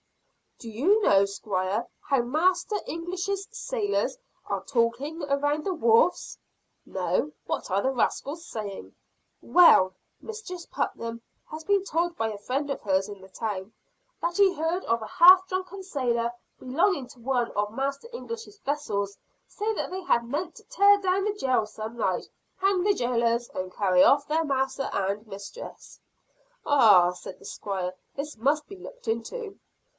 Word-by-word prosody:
"Do 230 - -9
you 335 - +3
know, 200 - +5
Squire, 200 +2 -2
how 275 -3 +1
Master 330 - +1
English's 370 +4 -3
sailors 475 -1 -1 0.3
are - - -3
talking 265 +6 -1
around 290 +2 0
the 385 - -1
wharves?" 235 +3 +3 0.5
"No! 300 - -1
What - - -3
are 195 +2 +2
the 265 - +1
rascals 285 +6 -1
saying?" 210 - -7 0.5
"Well, 190 - +6 0.2
Mistress 420 -6 -8
Putnam 230 0 -3 0.3
has 310 +1 -7
been 400 +2 +2
told 345 -2 -1
by 225 -6 -1
a 210 - -6
friend 270 +8 -2
of 275 - -3
hers 190 -1 +1
in 200 -2 -9
the 190 - -14
town, 205 -1 -4 0.5
that 345 0 -1
he 395 -2 +5
heard 330 +3 -1
a 230 -1 0
half 370 - +7
drunken 370 +1 -4
sailor, 240 -9 -1 0.3
belonging 280 +2 +1
to 250 - -15
one 245 -1 0
of 205 0 -1
Master 275 - -3
English's 460 -3 -7
vessels, 205 -9 -2 0.3
say 430 +1 -2
that - - -3
they 375 0 -4 0.2
meant 295 +9 -4
to - - -14
tear 405 -4 +5
down 385 0 +1
the 420 - 0
jail 255 - +1
some 220 +2 -7
night, 190 -5 0 0.3
hang 385 -1 +2
the 410 +1 +4
jailers, 235 -5 0
and 185 0 -5
carry 185 -3 +4
off 280 0 +4
their 320 +2 +1
Master 270 -1 -1
and 200 +3 -2
Mistress." 200 - -10 0.7
"Ah," 205 -11 +6
said 180 - -9
the - - -15
Squire, 185 -3 -4 0.2
"this 285 -2 -5
must 290 +6 +1
be 395 - -9
looked - - -12
into." 390 - -4
275 Hz, 155 wpm, -27 LUFS, 220-365 Hz, 0.7 s, half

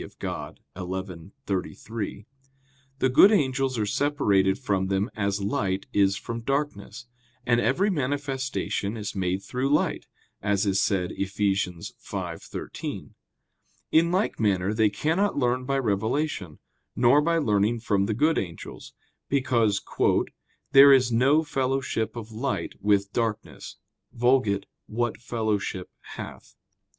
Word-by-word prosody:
Dei - - -7
xi, - - -6 0.9
33), 100 +2 -4 0.7
the 130 - +2
good 165 +11 +7
angels 135 - +1
are 105 - 0
separated 100 -7 +2
from 100 -7 -1
them 95 +4 0
as 100 -1 -1
light 100 -1 -1
is 100 -1 +3
from 115 0 -5
darkness; 135 -5 -3 0.4
and 120 -1 +3
every 195 +13 +2
manifestation 135 - -2
is 105 -2 -4
made 95 0 -1
through 125 +6 -2
light, 150 - +1 0.3
as 100 0 +1
is 100 -1 +2
said 90 -3 0
Eph. 100 - -3
5:13. 95 -4 -4 0.8
In 165 +2 +4
like 190 +4 0
manner 100 -2 +1
they 110 -1 +3
cannot 160 - 0
learn 125 -1 +1
by 135 +1 0
revelation, 110 - -1 0.4
nor 130 +5 +5
by 165 +2 +1
learning 110 -5 +1
from 100 -3 +1
the 110 - -1
good 155 +7 +3
angels: 85 -4 -8 0.3
because 120 -7 +1 0.9
"there 140 0 +9
is 130 -3 +5
no 135 +7 +4
fellowship 135 -5 -1
of 115 -1 -7
light 110 -6 -3
with 100 0 +2
darkness 115 -2 -3 0.4
[*Vulg.: 120 -5 +2 0.2
'What 120 0 -2
fellowship 105 -6 -2 0.2
hath - - -9
115 Hz, 120 wpm, -26 LUFS, 100-135 Hz, 0.9 s, there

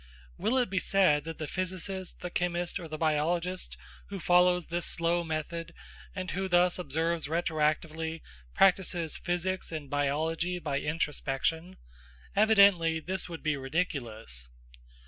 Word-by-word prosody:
Will 245 - +1
it 245 -6 +1
be 190 - +2
said 185 -8 +3
that 165 -1 -6
the 155 - -4
physicist, 185 +2 -4
the 180 - -5
chemist, 175 0 -1
or 170 - -7
the 155 0 -5
biologist 165 +4 0 0.3
who 200 -1 -6
follows 180 0 +4
this 170 +1 -2
slow 170 +1 +1
method, 165 +1 -4 0.4
and 185 -1 -3
who 195 +1 -2
thus 175 0 +4
observes 165 0 -1
retroactively, 160 0 -1 0.3
practises 180 -4 +3
physics 180 +1 -2
and 155 -4 -6
biology 160 +5 0
by 140 -5 -2
introspection? 160 +3 -1 0.6
Evidently 200 -6 +5
this 185 +3 -3
would 165 -1 -7
be 155 -2 +1
ridiculous. 125 - -3
170 Hz, 130 wpm, -30 LUFS, 155-180 Hz, 0.6 s, Evidently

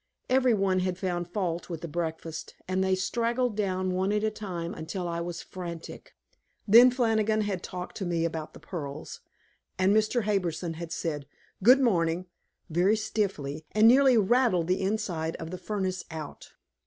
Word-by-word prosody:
Every 255 -2 +4
one 195 -2 +2
had 185 -1 -1
found 175 -2 -2
fault 175 -2 -3
with 165 -2 -5
the 170 - -5
breakfast, 160 0 -4
and 185 +1 +1
they 190 0 +2
straggled 235 +4 0
down 185 -3 -1
one 190 +2 0
at 210 0 0
a 220 - +1
time 180 -6 -5
until 175 +3 -4
I 170 0 -2
was 175 0 -5
frantic. 175 - -8 0.5
Then 235 +5 +9
Flannigan 220 -3 +1
had 200 -4 -2
talked 180 0 -6
to 195 - -3
me 170 -1 0
about 160 -2 -4
the - - -11
pearls, 150 -2 -7 0.6
and 190 +2 +3
Mr. 220 +2 +2
Harbison 180 -5 -1
had 170 0 -7
said, 150 -5 -3 0.3
"Good 250 +7 +7
morning," 175 -7 +1 0.4
very 180 +5 +3
stiffly, 185 -9 -2
and 215 +1 +6
nearly 260 0 +6
rattled 220 -4 +3
the 185 +3 0
inside 190 -6 -1
of 165 0 -7
the 185 - -5
furnace 190 -1 -2
out. 155 -3 -8
185 Hz, 165 wpm, -28 LUFS, 170-215 Hz, 0.6 s, Then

